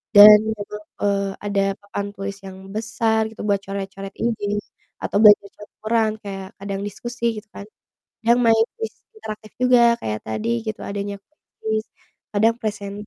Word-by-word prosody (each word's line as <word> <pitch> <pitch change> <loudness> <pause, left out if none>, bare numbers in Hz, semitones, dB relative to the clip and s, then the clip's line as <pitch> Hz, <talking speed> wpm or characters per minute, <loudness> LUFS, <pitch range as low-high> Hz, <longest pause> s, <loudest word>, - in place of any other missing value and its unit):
dan 210 +1 +12 0.2
memang, 210 0 -7 0.2
eee, 200 -1 +1 0.2
ada 200 -1 +1 0.2
papan 205 0 -4
tulis 195 0 -5
yang 190 -1 -8 0.2
besar 220 0 +1
gitu 225 - -10
buat 200 -1 +1
coret-coret 195 0 -6
izin 210 -3 -1 0.4
atau - - -2
belajar 210 -2 +8
coret 210 - -13
laporan 220 0 +1
kayak 195 -1 -6
kadang 195 0 -4
diskusi 240 +3 -6
gitu 210 - -8
kan, 200 - -8 0.6
kadang 235 +2 +4
main 225 - +6 0.2
kuis 450 - -4 0.2
interaktif 215 - -8
juga, 250 -1 +5 0.2
kayak 110 0 -2
tadi 160 - -3 0.2
gitu 220 +1 -4
adanya 200 0 -4 0.5
kuis 220 0 0 0.5
kadang 220 +2 +3
presen 205 -3 -4
205 Hz, 150 wpm, -22 LUFS, 200-220 Hz, 0.6 s, dan